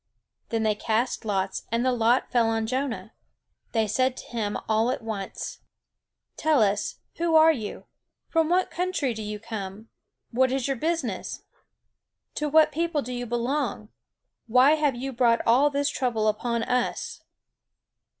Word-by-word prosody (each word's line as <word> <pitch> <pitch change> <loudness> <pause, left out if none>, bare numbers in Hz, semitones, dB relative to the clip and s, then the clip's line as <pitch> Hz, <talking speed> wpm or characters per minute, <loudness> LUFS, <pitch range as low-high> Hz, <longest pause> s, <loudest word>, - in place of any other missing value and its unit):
Then 225 -1 0
they 215 -1 +3
cast 225 +3 -1
lots, 195 -2 -2
and 235 +2 +1
the 255 - +3
lot 240 +1 +2
fell 235 -2 +3
on 225 0 0
Jonah. 255 +1 -3 0.6
They 225 -2 +2
said 255 +5 +1
to - - -8
him, 215 -3 -2
all 220 +2 +2
at 255 -2 -2
once: 210 -4 -5 0.8
"Tell 305 -7 +3
us, 205 0 0 0.2
who 335 -1 +1
are 320 +1 +8
you? 225 -9 -5 0.4
From 325 -1 +1
what 365 +1 +2
country 355 -8 -1
do 220 - -6
you 210 0 -4
come? 210 -1 -7 0.4
What 260 +2 +3
is 265 -1 0
your 275 - 0
business? 305 - -2 0.9
To 300 0 -2
what 310 +1 +5
people 320 -1 -1
do 250 +2 -5
you 245 0 -4
belong? 240 -1 -2 0.6
Why 255 +5 +6
have 300 -4 +2
you 265 +2 -4
brought 235 -1 +2
all 255 +6 +5
this 285 0 0
trouble 230 -5 0
upon 230 +2 0
us?" 250 +1 -1
245 Hz, 155 wpm, -26 LUFS, 220-285 Hz, 0.9 s, are